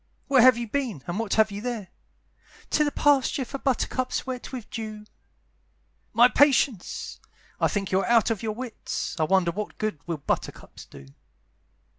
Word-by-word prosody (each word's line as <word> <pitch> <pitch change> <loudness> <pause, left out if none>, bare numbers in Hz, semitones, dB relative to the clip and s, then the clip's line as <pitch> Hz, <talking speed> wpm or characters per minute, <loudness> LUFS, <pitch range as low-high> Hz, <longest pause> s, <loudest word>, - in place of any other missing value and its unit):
"Where 270 -3 +5
have 255 -1 +7
you 235 -1 -4
been? 230 - -3
and 175 +4 -3
what 225 -3 -1
have 220 -1 +4
you 200 +1 -5
there?" 225 -6 -4 0.8
"To 300 - +3
the 290 - 0
pasture 280 -2 +2
for 275 +3 -6
buttercups 255 0 -1
wet 255 -2 -6
with 250 -5 -7
dew." 215 -2 -6 1.1
"My 235 +2 +6
patience! 265 -7 +1 0.4
I - - +3
think 195 -2 -3
you 190 - +3
are 195 - -2
out 230 -1 +4
of 220 - -2
your 220 -2 -2
wits; 245 -1 -5
I 155 - +3
wonder 185 0 +2
what 210 +4 -6
good 215 -8 -2
will 165 -2 -2
buttercups 140 - -4
do? 70 - -13
225 Hz, 170 wpm, -26 LUFS, 200-255 Hz, 1.1 s, have